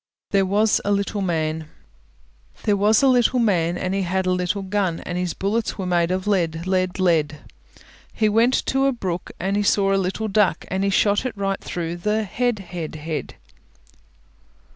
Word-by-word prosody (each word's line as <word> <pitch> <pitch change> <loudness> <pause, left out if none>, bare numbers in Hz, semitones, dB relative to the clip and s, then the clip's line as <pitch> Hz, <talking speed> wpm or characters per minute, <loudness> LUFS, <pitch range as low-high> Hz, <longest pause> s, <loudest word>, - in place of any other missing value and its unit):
THERE 195 -1 +3
WAS 210 +3 +2
A 205 - 0
LITTLE 200 0 0
MAN 160 -3 -2 0.9
There 210 - +2
was 210 +4 +3
a - - +6
little 250 -1 +3
man, 175 -7 +1
And 185 +1 -2
he 195 - 0
had 190 +1 -1
a 185 - +1
little 180 +2 -1
gun, 190 -3 -1
And 175 - -5
his 180 -1 -2
bullets 215 +4 -1
were 190 - -3
made 175 -2 +1
of 185 +1 -1
lead, 170 -5 0
lead, 185 -1 0
lead; 155 -5 +1 0.7
He 215 - +1
went 230 +4 +3
to 270 0 +1
the 275 - +2
brook 185 -7 -4
And 200 +2 0
saw 195 -1 +2
a - - +3
little 190 +4 -2
duck, 210 -1 +1
And 190 +1 -1
he 200 - +2
shot 205 +1 +2
it 255 -5 -4
right 195 -1 -2
through 170 0 -4
the 210 +4 0
head, 240 +3 -1 0.2
head, 165 -3 -5
head. 155 +1 -5
195 Hz, 185 wpm, -22 LUFS, 175-210 Hz, 0.9 s, a